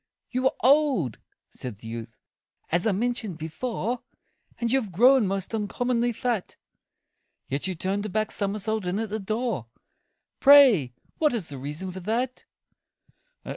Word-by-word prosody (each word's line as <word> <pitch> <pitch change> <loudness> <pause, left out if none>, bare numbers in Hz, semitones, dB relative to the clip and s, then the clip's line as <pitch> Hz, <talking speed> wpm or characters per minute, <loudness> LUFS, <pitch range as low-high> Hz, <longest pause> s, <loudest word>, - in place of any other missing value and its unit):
"You 255 +1 -1
are - - +3
old," 260 - +3 0.3
said 125 -5 -7
the 115 - -11
youth, 115 -1 -7 0.5
"as 175 +5 +2
I - - +3
mentioned 220 -3 -2
before, 230 +9 -3 0.6
And 235 -1 0
you 265 +1 +3
have 210 -5 -8
grown 245 +4 +5
most 195 +2 -2
uncommonly 240 +3 0
fat; 235 -3 -2 0.9
Yet 140 +7 -2
you 185 - -3
turned 195 +4 -2
a - - -6
back 215 +2 -1
somersault 210 0 -1
in 180 +2 -1
at 220 0 -2
the 215 +2 -3
door 215 - -2 0.7
Pray 255 - +7 0.2
what 300 -5 +3
is 205 -8 -3
the 140 -2 -7
reason 150 +8 -5
for 185 - -7
that?" 235 +7 -2
215 Hz, 150 wpm, -26 LUFS, 180-245 Hz, 0.9 s, Pray